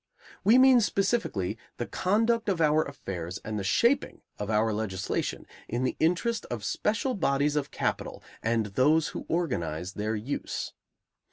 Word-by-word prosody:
We 220 +5 +6
mean, 260 -2 +7
specifically, 190 - 0 0.2
the 120 - -2
conduct 225 - +1
of 185 -4 0
our 155 -1 +4
affairs 95 -10 -6
and 110 -1 -3
the - - -3
shaping 235 - +2 0.2
of 105 - -3
our 110 0 +2
legislation 95 -3 -2 0.2
in 120 +3 -2
the 130 - 0
interest 180 +8 +1
of 120 -4 -4
special 225 - 0
bodies 145 - +1
of 145 -2 -1
capital - - -3 0.2
and 115 -1 +1
those 145 +10 +3
who - - -7
organize 90 - -1
their 110 +2 -2
use. 115 +7 -4
140 Hz, 150 wpm, -28 LUFS, -, 0.2 s, mean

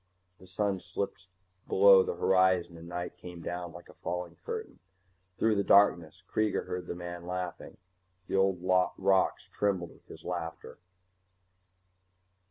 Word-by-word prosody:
The 95 - -15
sun 95 +1 -1
slipped 95 +1 -5 0.4
below 95 0 +7
the 95 - -2
horizon 95 -1 +3
and 85 0 -11
night 90 0 -5
came 90 0 -9
down 90 -1 -4
like 85 +1 -12
a - - -15
falling 90 -1 -5
curtain. - - -6 0.6
Through 110 - +3
the 100 -1 +1
darkness 90 -4 +4
Kreega 110 -1 0
heard 90 -1 -5
the - - -4
man 85 0 -7
laughing. 90 -1 -5 0.5
The - - -3
old 95 -1 +3 0.4
rocks 95 0 +2
trembled 95 -5 0
with - - -24
his - - -12
laughter. 85 -2 -5
90 Hz, 140 wpm, -30 LUFS, 85-95 Hz, 0.6 s, below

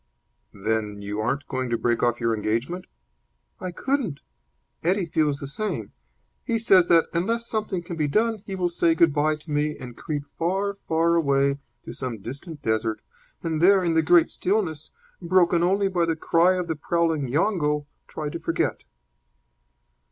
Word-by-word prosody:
"Then 105 0 -2
you 105 +1 -4
aren't 140 +6 -1
going 130 -2 -2
to 120 - +1
break 120 0 0
off 120 -1 +1
your 115 -1 +1
engagement?" 115 - -2 0.7
"I 185 - -4
couldn't. 220 - -2 0.6
Eddie 185 +3 +2
feels 155 -3 +1
the 145 - -7
same. 150 - -4 0.5
He 230 - 0
says 190 -6 +5
that, 165 -1 +5
unless 230 +8 0
something 210 -5 -2
can 170 -1 -6
be 150 -2 +1
done, 220 +7 +1
he 195 -1 -7
will 180 -2 0
say 170 -1 +2
good 165 -2 +4
bye 155 +1 +2
to 155 +1 -12
me 150 +1 0
and 125 -2 -9
creep 145 +1 -4 0.2
far, 195 +4 0
far 165 +1 +2
away 140 -3 +2 0.2
to - - -8
some 125 -3 -4
distant 140 - -9
desert, 110 0 0 0.4
and 160 -2 -1
there, 190 +1 +6
in 170 -2 +1
the 160 - +4
great 170 +1 +4
stillness, 180 -6 -1 0.3
broken 175 -1 +3
only 195 +3 +2
by 180 -3 +1
the 165 -1 0
cry 170 +3 +3
of 180 -1 -2
the 160 - -1
prowling 160 -2 0
yongo, 150 - +1 0.2
try 150 -1 -4
to 170 - -5
forget." 165 0 -1
165 Hz, 170 wpm, -25 LUFS, 140-180 Hz, 0.7 s, there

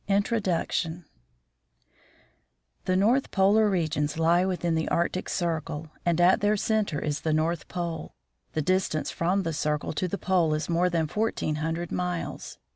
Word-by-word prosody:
INTRODUCTION 190 -5 0 1.8
The 185 - +1
north 230 +8 +3
polar 205 +2 +4
regions 155 -5 0
lie 170 +2 +4
within 175 -3 -1
the 160 0 0
Arctic 175 +2 0
circle, 160 -2 -2
and 170 -1 +1
at 180 +3 +5
their 210 +1 +2
center 215 -6 0
is 150 -1 -2
the 160 0 0
North 160 +2 0
Pole. 170 -2 -5 0.4
The 155 - 0
distance 185 -3 0
from 185 +4 0
the 165 -2 -2
circle 150 0 -1
to 180 +4 -1
the 200 - -3
pole 175 -4 +2
is 155 - -3
more 175 +1 +2
than 165 -2 +1
fourteen 180 -4 -1
hundred 165 +2 -3
miles. 180 -1 -3
170 Hz, 150 wpm, -27 LUFS, 160-190 Hz, 1.8 s, at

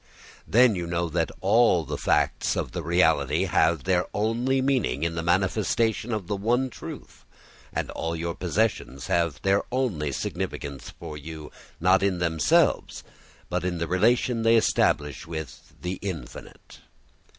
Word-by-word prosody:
Then 120 0 +5
you 90 -3 -3
know 85 0 -1
that 80 0 0
all 100 -5 +4
the - - -4
facts - - +1
of - - -2
the - - -4
reality 80 -2 +2
have 80 -4 +2
their 90 +3 +1
only 120 +5 +1
meaning 130 - 0
in 85 0 0
the 85 - -2
manifestation 105 +6 +1
of 105 -4 -2
the 100 - -2
one 120 +6 0
truth, - - -10 0.5
and - - -3
all 85 0 -3
your 85 +1 -3
possessions 90 -6 -1
have 85 -6 0
their 100 +1 +3
only 105 - -1
significance 70 +1 -4
for 75 - -9
you, 75 0 -9 0.3
not 95 +3 +4
in 95 -2 +1
themselves 80 -3 +1 0.4
but 90 0 -2
in 90 -1 -1
the 85 - -1
relation 115 +6 +2
they 115 +1 +4
establish 75 -10 +1
with 80 -3 -8
the 90 +2 -4
infinite. 85 -10 -8
90 Hz, 150 wpm, -26 LUFS, 80-110 Hz, 0.5 s, Then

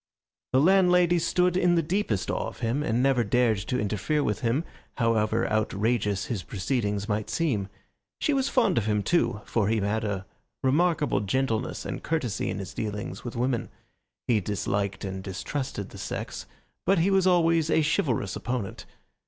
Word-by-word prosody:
The 130 - +4
landlady 180 +1 +5
stood 180 +2 +2
in 180 -1 +3
the 165 - +2
deepest 165 - -1
awe - - -2
of - - -10
him 120 +5 0
and 125 -3 +1
never 135 -3 +3
dared 115 -1 +2
to 125 +6 -2
interfere 110 +9 0
with 105 -6 -1
him, 120 +6 0 0.3
however 115 -3 +2
outrageous 105 -1 0
his 115 -6 -3
proceedings 105 +1 -2
might 105 -1 -1
seem. 125 -13 0 0.5
She 300 - +1
was 270 0 +1
fond 245 - +3
of 110 - -3
him, 105 -1 +1
too, 120 - +1
for 110 -4 0
he 110 +1 +2
had 105 +2 0
a 100 -3 -2 0.4
remarkable 150 - +2
gentleness 115 +3 -1
and - - -4
courtesy 145 -11 -1
in - - -3
his 95 -2 -6
dealings 105 -2 -4
with 120 - -6
women. 120 0 -1 0.6
He 115 -3 +3
disliked 100 0 -2
and 95 0 -4
distrusted 100 +3 -4
the 100 - -10
sex, - - -5 0.4
but 195 - +4
he 175 +4 +3
was 190 -1 +3
always 165 -3 +3
a 160 - +3
chivalrous 125 -9 0
opponent. 120 -5 -4
120 Hz, 170 wpm, -27 LUFS, 105-160 Hz, 0.6 s, landlady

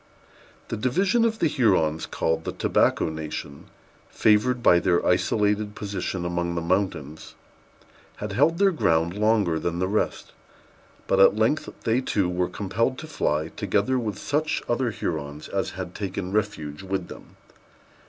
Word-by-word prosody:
The - - -3
division 185 - +2
of 225 -1 0
the - - +1
Hurons 95 - +1
called 80 0 -1
the - - -3
Tobacco - - +1
Nation, 75 -2 -6 0.4
favored 115 +3 +2
by 85 - +6
their 90 -1 +1
isolated 105 0 +1
position 100 -3 -4
among 85 0 -2
mountains, 85 -4 -2 0.8
had 105 0 -5
held 145 +11 +3
their 200 +1 +4
ground 85 - +1
longer 105 -5 +2
than 85 +1 -2
the 95 +1 0
rest; 105 +3 -1 0.7
but 95 - +1
at 95 - +7
length 110 +8 +1
they, 115 +2 +2
too, 100 -7 0
were 90 0 -1
compelled 115 +7 -1
to 155 - -7
fly, 80 - -1
together 130 +8 0
with 105 -5 -3
such 150 +7 -1
other 120 +1 0
Hurons 75 -7 -4
as - - -1
had 90 -1 -5
taken 95 -2 -4
refuge 95 -8 -2
with 95 -2 -3
them. - - -12
100 Hz, 145 wpm, -25 LUFS, 85-115 Hz, 0.8 s, at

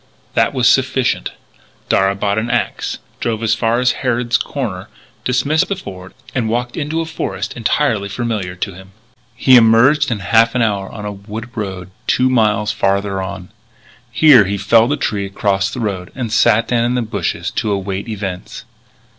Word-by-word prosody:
That 145 - +1
was 125 -2 +3
sufficient. 130 -1 +2 0.6
Darragh 95 0 +2
bought 100 +1 +1
an 115 +2 -3
axe, - - -1 0.2
drove 115 -1 -2
as 110 -1 +2
far 115 +1 +1
as 125 0 +3
Harrod's 120 -2 0
Corners, 110 -12 -3 0.4
dismissed 135 +5 +1
the 200 - -2
Ford, 95 - -10 0.2
and 120 -5 -1
walked 120 +2 -2
into 160 +2 -2
a - - -3
forest 110 -10 -4
entirely 115 -3 0
familiar 105 -5 -3
to 95 +1 -4
him. 95 +2 -14 0.4
He 130 - +5
emerged 125 +6 +5
in 115 - -1
half 115 +4 +3
an 125 - +2
hour 100 -3 -1
on 105 -2 -8
a 105 - -3
wood 105 +3 -8
road 95 -4 -5 0.2
two 130 0 +2
miles 105 -3 +2
farther 100 -2 0
on. 95 -1 -6 0.6
Here 130 -5 +6
he 100 +1 -2
felled 115 +5 +3
a 145 - +1
tree 100 -7 -2
across 95 -1 0
the - - -6
road 100 -4 -3
and 120 -5 -4
sat 115 -1 +3
down 120 -1 +1
in 120 +1 0
the 125 - 0
bushes 110 - -3
to 105 - -2
await 100 +1 -3
events. 100 0 -6
110 Hz, 175 wpm, -17 LUFS, 100-125 Hz, 0.6 s, Here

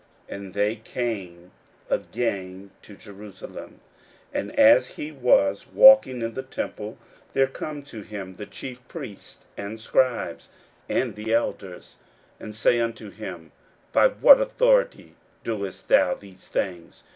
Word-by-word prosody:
41:011:027 - - -4
And 95 -2 -10
they 105 +2 +1
come 100 -7 -5 0.4
again 95 -4 -3
to 105 - -14
Jerusalem: 100 -1 -11 0.5
and - - -3
as - - +7
he 150 - -5
was 120 -8 +2
walking 265 - +7
in 115 0 -3
the 130 - -4
temple, 110 -5 -6 0.4
there 135 - +4
come 145 +2 -7
to 115 -6 -10
him 100 -3 -8
the 105 - -8
chief 125 -2 -9
priests, 135 - -10
and 100 +2 -6
the - - -16
scribes, 130 -1 0 0.4
and - - 0
the 105 +1 -5
elders, 100 -5 -3 0.4
41:011:028 - - -10
And 105 -1 -8
say 115 +3 +3
unto 115 -2 -3
him, 90 -7 -9 0.4
By - - +6
what - - +7
authority - - +1 0.3
doest 100 -5 -5
thou 90 - +4
these 95 -2 -17
things? 90 -3 -4
110 Hz, 140 wpm, -24 LUFS, 100-130 Hz, 0.5 s, as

